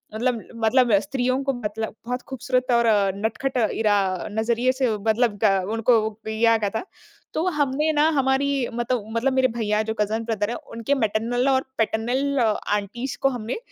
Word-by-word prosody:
मतलब 240 -1 0
मतलब 230 +2 +3
स्त्रियों 255 +1 -1
को 275 0 0
मतलब 220 -2 -4
बहुत 250 +1 -3
खूबसूरत 255 -1 -1
और 235 0 +4 0.3
नटखट 250 +6 -2 0.2
ईरा 210 -2 +2 0.3
नजरिए 235 +3 +1
से 260 -2 0
मतलब 220 +1 +1
ग 195 -3 +3
उनको 225 +1 +3 0.3
दिया 225 +1 +3
गया 205 -2 -1
था। - - -1 0.5
तो 320 - -1
हमने 290 +2 +1
ना, 300 +1 +4
हमारी 275 -2 +1
मतलब 240 -2 -1
मतलब 260 +3 +1
मेरे 260 0 +3
भैया 210 -1 +1
जो 220 0 -3
कज़न 220 +2 0
ब्रदर 215 -2 -1
है 240 - -2
उनके 230 +5 -3
मैटरनल 240 +3 0
और 265 0 +2
पैटर्नल 250 +5 0
आंटीज़ 215 +2 -1
को 275 - +4
हमने 240 - -4
240 Hz, 160 wpm, -23 LUFS, 220-260 Hz, 0.5 s, और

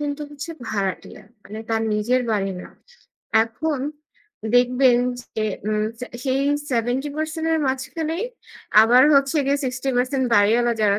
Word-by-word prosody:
কিন্তু 290 0 -3
হচ্ছে 290 +3 -7 0.2
ভাড়াটিয়া, 195 -3 -4 0.2
মানে 215 +3 -9
তার 225 0 0
নিজের 235 +5 +1
বাড়ি 195 -2 0
না। - - -10 0.8
এখন 275 +5 -3 0.8
দেখবেন 250 0 +4 0.2
যে, 220 -2 -4 0.2
উম 215 0 0 0.2
সে 250 - -5 0.2
সেই 265 0 +1 0.3
৭০% 275 +6 -1 0.2
এর 320 - +2
মাঝখানেই 310 - -2 0.6
আবার 245 +3 +6
হচ্ছে 275 +2 +3
গিয়ে 280 +1 +2
৬০% 255 0 -1 0.2
বাড়িওয়ালা 230 +4 +4
যারা 200 -1 +3
255 Hz, 125 wpm, -22 LUFS, 225-280 Hz, 0.8 s, আবার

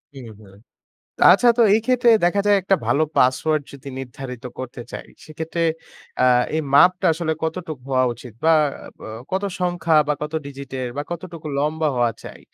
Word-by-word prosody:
হুম, 130 -3 -9
হুম। 100 -2 -17 0.7
তো - - -5
আচ্ছা, 240 +6 +4
তো 235 - +6
এই 220 - +3
ক্ষেত্রে 250 -1 +2 0.2
দেখা 190 +3 +2
যায়, 205 -1 +5
একটা 195 +1 +2
ভালো 155 - +2
পাসওয়ার্ড 145 +4 +2
যদি 140 0 -10
নির্ধারিত 125 -1 -8
করতে 130 -1 -7
চাই, - - -8 0.2
সেক্ষেত্রে 160 +2 -4 0.6
আ - - +5 0.3
এই - - +1
মাপটা 180 +5 +5
আসলে 160 -1 -2
কতটুক 160 -3 -4
হওয়া 130 -1 +2
উচিত 120 0 -12
বা 165 - +5 0.5
আ - - -8 0.2
কত 190 +1 0 0.2
সংখ্যা 175 -2 0
বা 150 - +3
কত 150 +1 -4
ডিজিটের 135 -2 -6
বা 145 - -2
কতটুকু 170 -2 -7
লম্বা 155 +2 0
হওয়া 120 -2 +2
চাই? - - -11
155 Hz, 170 wpm, -21 LUFS, 130-175 Hz, 0.7 s, তো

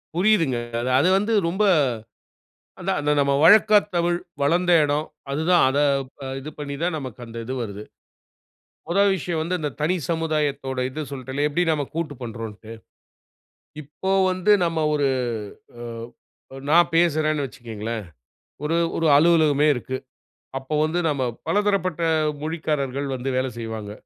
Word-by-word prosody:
புரியுதுங்க. 175 - +3 0.2
அது 125 - -2
அது 165 +6 +3
வந்து 210 +3 0
ரொம்ப 190 +5 0 1.2
அதான் - - -1
அந்த 150 0 +1
நம்ம 140 0 +2
வழக்கத் 210 +3 +6
தமிழ், 175 0 +1 0.2
வளந்த 170 +5 +2
இடம் 150 +1 0 0.2
அதுதான். 160 +5 +3
அத 135 - -1 0.5
அ - - -5
இது 140 +3 -7
பண்ணி 140 -1 -4
தான் 175 -1 0
நமக்கு 130 -6 -7
அந்த 115 0 -10
இது 130 - -4
வருது. 105 -2 -6 1.1
மொத 175 +3 0 0.2
விஷயம் 170 -2 -3
வந்து, 170 +3 -2
இந்த 150 -1 -2
தனி 165 +5 +1
சமுதாயத்தோட 150 -5 -1
இது 130 +4 -6
சொல்ட்டேன்ல, 135 +1 -2
எப்படி 150 +4 0
நாம 145 -3 -1
கூட்டு 165 -3 -3
பண்றோம்ன்ட்டு. 115 -2 -7 1.1
இப்போ 150 +6 -5 0.2
வந்து 185 +3 +2
நம்ம 165 -1 -1 0.2
ஒரு 145 -2 +2 0.7
அ - - -7 0.9
நான் 170 +2 +5
பேசுறேன்னு 155 -3 +2
வச்சுக்கங்களேன். 115 -3 -6 0.6
ஒரு 155 +2 0 0.2
ஒரு 165 - +1
அலுவலகமே 155 -2 +4
இருக்கு. 130 +2 -4 0.6
அப்போ 135 +3 -6
வந்து 160 +3 -1
நம்ம 140 -3 -1 0.2
பலதரப்பட்ட 200 -5 0 0.4
மொழிக்காரர்கள் 150 -4 -2
வந்து 130 +1 -4
வேலை 130 0 0
செய்வாங்க. 110 -2 -5
150 Hz, 135 wpm, -23 LUFS, 130-170 Hz, 1.2 s, வழக்கத்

